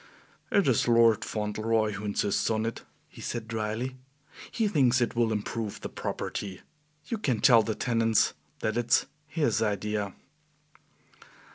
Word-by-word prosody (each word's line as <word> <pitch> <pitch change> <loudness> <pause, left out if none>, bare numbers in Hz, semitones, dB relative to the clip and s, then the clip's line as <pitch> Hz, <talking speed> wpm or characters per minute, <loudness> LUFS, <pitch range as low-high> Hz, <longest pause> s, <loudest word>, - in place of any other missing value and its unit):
"It 200 - +3
is 125 -3 +3
Lord 115 -2 +5
Fauntleroy 110 +1 0
who 100 +1 -6
insists 100 -1 0
on 110 0 0
it," 115 - -4 0.3
he - - -13
said 115 -2 -4
dryly; 115 +3 -3 0.5
"he 225 -2 0
thinks 130 - +3
it 120 -1 0
will 115 -1 +2
improve 110 0 -3
the - - -5
property. 95 -3 -4 0.4
You 230 - -3
can 130 - 0
tell 115 -1 +7
the 110 0 -2
tenants 115 -3 +2 0.3
that 110 +1 -1
it's 120 0 +3 0.2
his 145 -9 0
idea." 105 -1 -1
115 Hz, 140 wpm, -28 LUFS, 105-120 Hz, 0.5 s, tell